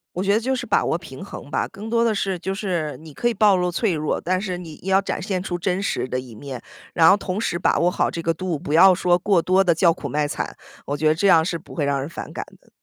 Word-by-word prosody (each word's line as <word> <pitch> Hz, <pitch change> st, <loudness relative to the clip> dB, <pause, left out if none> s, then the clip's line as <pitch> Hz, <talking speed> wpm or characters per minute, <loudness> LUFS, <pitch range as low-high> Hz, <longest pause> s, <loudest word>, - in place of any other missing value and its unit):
我 180 Hz, -, -1 dB
觉 200 Hz, -, +2 dB
得 210 Hz, -, +3 dB
就 260 Hz, +3 st, -1 dB
是 250 Hz, -, -4 dB
把 215 Hz, -, +2 dB
握 -, -, +1 dB
平 170 Hz, -2 st, -8 dB
衡 145 Hz, -, -9 dB
吧， -, -, -1 dB
更 210 Hz, +3 st, -9 dB
多 230 Hz, 0 st, +2 dB
的 230 Hz, -2 st, +2 dB
是 195 Hz, -2 st, -1 dB
就 190 Hz, +3 st, -3 dB
是 180 Hz, -7 st, -2 dB
你 155 Hz, -1 st, -13 dB
可 240 Hz, -, 0 dB
以 240 Hz, -, +1 dB
暴 205 Hz, -2 st, +4 dB
露 180 Hz, -1 st, 0 dB
脆 195 Hz, +2 st, 0 dB
弱， 155 Hz, -1 st, -1 dB
但 185 Hz, +1 st, 0 dB
是 185 Hz, -3 st, -4 dB
你 165 Hz, -4 st, -10 dB
要 190 Hz, +1 st, +3 dB
展 195 Hz, -, -3 dB
现 185 Hz, 0 st, -2 dB
出 180 Hz, -1 st, -3 dB
真 180 Hz, +1 st, -1 dB
实 200 Hz, -, -1 dB
的 130 Hz, -, -2 dB
一 125 Hz, -3 st, -10 dB
面， 130 Hz, +1 st, -7 dB, 0.3 s
然 165 Hz, -1 st, +6 dB
后 195 Hz, -, +6 dB
同 195 Hz, +1 st, -3 dB
时 170 Hz, -, -1 dB
把 -, -, +1 dB
握 175 Hz, -, +3 dB
好 -, -, 0 dB
这 165 Hz, -, -4 dB
个 165 Hz, -, +1 dB
度， 175 Hz, 0 st, -3 dB
不 145 Hz, -, -4 dB
要 185 Hz, +4 st, +8 dB
说 175 Hz, -1 st, +2 dB
过 185 Hz, -1 st, +2 dB
多 185 Hz, +3 st, +3 dB
地 175 Hz, -3 st, +3 dB
叫 170 Hz, +1 st, +4 dB
苦 -, -, -5 dB
卖 150 Hz, 0 st, 0 dB
惨， -, -, -4 dB, 0.3 s
我 145 Hz, -, -2 dB
觉 155 Hz, +2 st, +1 dB
得 155 Hz, -, +4 dB
这 200 Hz, +5 st, +1 dB
样 165 Hz, -4 st, +6 dB
是 170 Hz, +1 st, -2 dB
不 165 Hz, -, -14 dB
会 155 Hz, -, -2 dB
让 140 Hz, -1 st, 0 dB
人 135 Hz, -, -3 dB
反 170 Hz, -, -8 dB
感 -, -, -5 dB, 0.2 s
的。 -, -, -26 dB
180 Hz, 320 characters per minute, -22 LUFS, 160-195 Hz, 0.3 s, 要